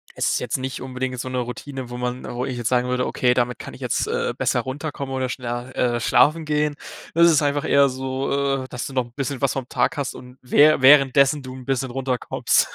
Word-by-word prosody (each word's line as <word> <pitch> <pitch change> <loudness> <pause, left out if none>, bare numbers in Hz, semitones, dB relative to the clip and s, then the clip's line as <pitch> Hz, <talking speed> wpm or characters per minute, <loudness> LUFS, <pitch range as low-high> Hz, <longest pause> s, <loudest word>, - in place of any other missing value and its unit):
es - - 0
ist - - +1
jetzt - - -2
nicht 130 -1 -5
unbedingt 130 -1 -4
so 130 - -4
'ne 130 0 -2
Routine, 125 +1 -6
wo 125 - -6
man 125 +1 -3
wo 125 +1 -3
ich 130 -2 -4
jetzt 120 -1 -1
sagen 125 0 +1
würde: 125 0 0
„Okay, 125 -1 +2
damit 125 -1 -1
kann - - -8
ich - - -13
jetzt, - - -1
äh, - - -1
besser - - +1
runterkommen 140 0 -5
oder 130 -1 -1
schneller, 120 0 -5
äh, 120 -1 +1
schlafen 155 +6 +3
gehen.“ 150 0 0 0.4
Das 170 +1 +6
ist 155 -2 +4
einfach 145 0 0
eher 140 0 +5
so, 135 +1 -1
äh, - - -8
dass 125 - -5
du 135 - -9
noch 130 -2 0
'n 120 - -18
bisschen 140 -1 -3
was 140 - +1
vom 135 -2 -4
Tag 125 +2 0
hast 140 -2 -2
und 125 0 -12
wä 145 +4 +5
währenddessen 140 +1 +5
du 130 -1 -8
'n 130 -1 -10
bisschen 130 -1 -1
runterkommst. 130 -1 0
130 Hz, 235 wpm, -22 LUFS, 125-140 Hz, 0.4 s, Das